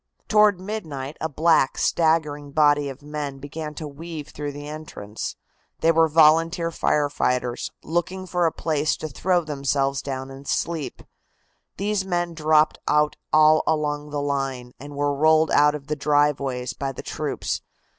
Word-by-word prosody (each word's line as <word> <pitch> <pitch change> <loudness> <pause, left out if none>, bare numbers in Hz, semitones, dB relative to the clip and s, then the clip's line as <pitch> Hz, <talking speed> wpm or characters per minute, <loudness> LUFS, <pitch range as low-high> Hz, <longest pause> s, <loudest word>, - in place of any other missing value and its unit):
Toward 210 -3 +4
midnight 160 -9 -5
a 160 - -1
black, 155 -2 +3
staggering 150 -3 +1
body 145 -1 +3
of 135 +1 -10
men 145 -2 -5
began 150 +2 -7
to 155 - -5
weave 155 +1 -8
through 145 0 -5
the 145 +1 -8
entrance. 150 -9 -6 0.5
They 165 - +5
were 165 0 +4
volunteer 165 +2 +4
fire 150 -2 +1
fighters, 125 -3 -1
looking 175 +3 -2
for 175 -1 +1
a - - 0
place 155 -2 0
to 155 - -5
throw 175 +5 0
themselves 140 -2 -1
down 135 -1 -5
and 135 +1 -11
sleep. 165 -4 -2 0.7
These 205 0 0
men 175 -2 -1
dropped 155 -1 +3
out 150 0 +3 0.2
all 155 0 +6
along 150 -1 0
the 145 -1 -3
line, 135 -3 -2
and 145 +1 -9
were 145 0 0
rolled 155 +2 +4
out 150 +1 +5
of 140 -2 -8
the 150 +1 -2
driveways 140 -3 +1
by 135 -1 -3
the - - -9
troops. - - -3
150 Hz, 155 wpm, -24 LUFS, 140-160 Hz, 0.7 s, all